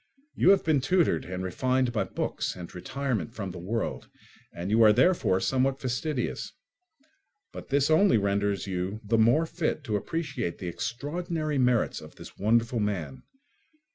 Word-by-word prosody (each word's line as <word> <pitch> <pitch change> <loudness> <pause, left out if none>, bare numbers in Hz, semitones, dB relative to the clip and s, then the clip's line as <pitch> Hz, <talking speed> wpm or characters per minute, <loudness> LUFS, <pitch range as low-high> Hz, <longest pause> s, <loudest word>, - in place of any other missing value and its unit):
You - - +3
have 195 - +5
been 155 -4 +2
tutored 155 - +2
and 90 0 -5
refined 130 +6 0
by 110 - 0
books - - -3
and 90 -2 -9
retirement 130 - -3
from 100 -4 -4
the 90 - -8
world, 110 +6 -3 0.4
and 90 +4 -5
you 110 +2 +4
are 110 -1 +8
therefore 125 - +3
somewhat 135 +5 +1
fastidious; 130 +2 -3 1.0
but - - -9
this 140 +2 +2
only 160 - +5
renders 100 0 0
you 95 +2 -3
the 115 +2 +1
more 120 +9 +4
fit 160 -2 -2
to 110 -7 -1
appreciate 135 - -3
the 90 - -5
extraordinary 150 - -3
merits 125 -2 +2
of - - -13
this - - -12
wonderful 115 +3 +1
man. 90 -10 -3
120 Hz, 155 wpm, -27 LUFS, 100-140 Hz, 1.0 s, are